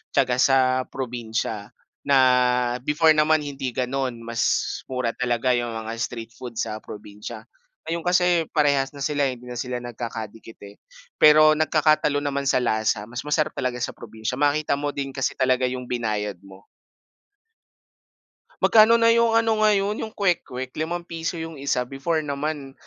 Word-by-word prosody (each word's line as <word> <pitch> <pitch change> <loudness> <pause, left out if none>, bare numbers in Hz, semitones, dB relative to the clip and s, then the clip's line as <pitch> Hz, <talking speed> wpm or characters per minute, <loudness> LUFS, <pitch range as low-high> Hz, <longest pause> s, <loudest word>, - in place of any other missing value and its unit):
tiyaka 125 0 +2
sa, 130 -1 +3
probinsya 115 -4 -4 0.3
na 140 -1 +5 0.6
before 155 +5 +3
naman 155 0 +3
hindi 135 -4 -5
gano'n, 130 0 -2
mas 115 0 -1
mura 125 -3 -2
talaga 125 0 0
yung 120 -2 -1
mga 110 0 -5
street 115 -1 -4
food 120 -1 -9
sa 110 -1 -3
probinsya. 105 -1 -9 0.4
Ngayon 170 +1 -3
kasi 180 0 +3 0.2
parehas 140 -3 +2
na - - -9
sila 145 -1 +1
hindi 125 -1 -8
na 125 - -7
sila 125 +1 -3
nagkakadikit, 115 -2 -7
eh, 100 0 -13 0.4
pero 155 0 +7
nagkakatalo 155 -1 +2
naman 140 -1 -1
sa - - +3
lasa. 110 -2 0
Mas 120 +3 -6
masarap 150 +1 0
talaga 125 -2 -2
sa 125 - -3
probinsya, 110 -1 -6
makita 145 +1 +1
mo 145 +1 -2
din 135 -1 -4
kasi 135 -1 -2
talaga 130 0 +2
yung 125 0 -5
binayad 105 -6 -3
mo. 95 0 -16 2.0
Magkano 220 +1 +6
na 230 0 +4
yung 230 0 +3
ano 225 -1 +2
ngayon, 205 0 +2
yung 220 -1 -5
kwek-kwek, 130 -9 -1
₱5 170 +1 -3
yung 160 -2 -7
isa, 140 -2 0
before 140 +5 -2
naman 145 -1 -4
135 Hz, 150 wpm, -23 LUFS, 120-155 Hz, 2.0 s, pero